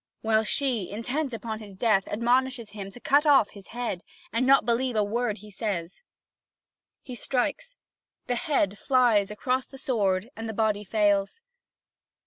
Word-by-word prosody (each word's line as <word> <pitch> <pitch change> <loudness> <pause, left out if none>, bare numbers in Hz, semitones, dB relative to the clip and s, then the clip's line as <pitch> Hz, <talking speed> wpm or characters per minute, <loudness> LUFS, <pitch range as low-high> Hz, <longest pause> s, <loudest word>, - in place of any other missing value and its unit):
While 220 0 +2
she, 235 -4 0
intent 255 +7 -2
upon 220 -1 -5
his 205 -3 -10
death, 195 -2 +2
admonishes 240 0 0
him 200 -2 -7
to 220 - -12
cut 285 +5 +3
off 270 -8 +5
his 200 -2 -13
head, 235 -6 -4 0.3
and 245 +3 +1
not 275 +1 +7
to - - -18
believe 245 +1 +1
a 210 - +3
word 220 +1 -1
he 210 +2 -13
says. 190 -4 -4 1.0
He 255 - -8
strikes: 270 - -2 0.5
the 245 - -1
head 235 -6 0
flies 240 -7 +3
across 255 +5 -1
the 270 - -12
sward 210 -5 0
and 225 0 -5
the 220 - -5
body 215 -2 +1
fails. 205 - +1
225 Hz, 160 wpm, -27 LUFS, 205-255 Hz, 1.0 s, not